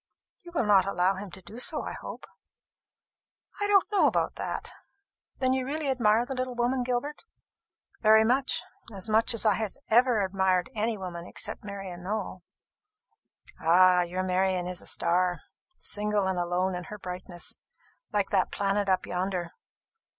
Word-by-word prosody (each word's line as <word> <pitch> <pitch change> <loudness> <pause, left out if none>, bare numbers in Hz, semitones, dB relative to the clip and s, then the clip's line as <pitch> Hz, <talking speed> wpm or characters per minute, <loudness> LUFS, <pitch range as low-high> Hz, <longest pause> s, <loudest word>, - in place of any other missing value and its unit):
"You 345 - -11
will 245 - +2
not 200 -2 +5
allow 185 -1 +2
him 195 +1 -7
to 185 - -10
do 225 - -10
so, 300 +4 +1
I - - -5
hope?" - - -8 1.3
"I 410 - +1
don't 400 -2 +5
know 410 - +4
about - - +1
that. - - -5 0.7
Then 260 -1 +2
you 260 0 0
really 285 +1 -1
admire 235 -2 +3
the 265 - -4
little 255 -1 -3
woman, 245 +2 +1
Gilbert?" 250 +4 -2 0.8
"Very 220 0 +6
much; 255 +4 +2 0.3
as 195 0 -4
much 225 +2 +3
as 230 - +1
I 215 - +5
have 215 +1 -3
ever 240 -1 +4
admired 190 -1 +1
any 220 +1 -1
woman 175 -3 -6
except - - -4
Marian 195 -3 -7
Nowell." 195 -1 -4 1.2
"Ah, 180 +2 +6
your 180 +1 -2
Marian 185 -1 +1
is 180 0 -5
a - - -11
star, 175 0 +1 0.4
single 210 -1 -1
and 190 -1 0
alone 180 +2 0
in 180 -1 -5
her 210 - -8
brightness, 180 -2 -7 0.5
like 205 -2 0
that 190 -2 +2
planet 200 0 0
up 185 - +2
yonder! 180 -1 -2
200 Hz, 160 wpm, -28 LUFS, 185-235 Hz, 1.3 s, Very